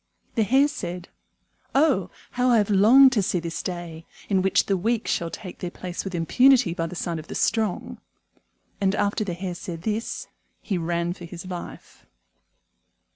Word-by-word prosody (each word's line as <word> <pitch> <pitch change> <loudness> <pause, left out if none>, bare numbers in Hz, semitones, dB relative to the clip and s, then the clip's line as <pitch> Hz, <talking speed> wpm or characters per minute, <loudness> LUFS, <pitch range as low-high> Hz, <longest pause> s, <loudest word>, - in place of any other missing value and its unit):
The 225 - +1
Hare 265 +7 +4
said, 180 -10 -6 0.7
"Oh, 270 - +3 0.2
how 250 0 +1
I 240 - +5
have 210 -1 +1
longed 240 +7 +7
to 230 -5 +2
see 185 -1 0
this 165 -1 -4
day, 170 -2 -6 0.2
in 190 -2 +3
which 195 +1 +2
the 195 - +1
weak 220 +5 -1
shall 170 - -1
take 185 0 -9
their 180 - -4
place 180 0 -6
with 190 -2 -5
impunity 245 +4 +4
by 165 -1 -2
the 180 - -8
side 170 -1 -3
of 155 - -11
the - - -7
strong." 220 -5 -1 0.8
And 195 0 +2
after 205 +1 0
the 180 -4 -4
Hare 180 0 -4
said 170 -1 -7
this, 220 +2 -3 0.3
he 190 -5 -2
ran 170 +1 -1
for 180 - -10
his 170 +1 -9
life. 180 -2 -9
190 Hz, 180 wpm, -24 LUFS, 175-220 Hz, 0.8 s, longed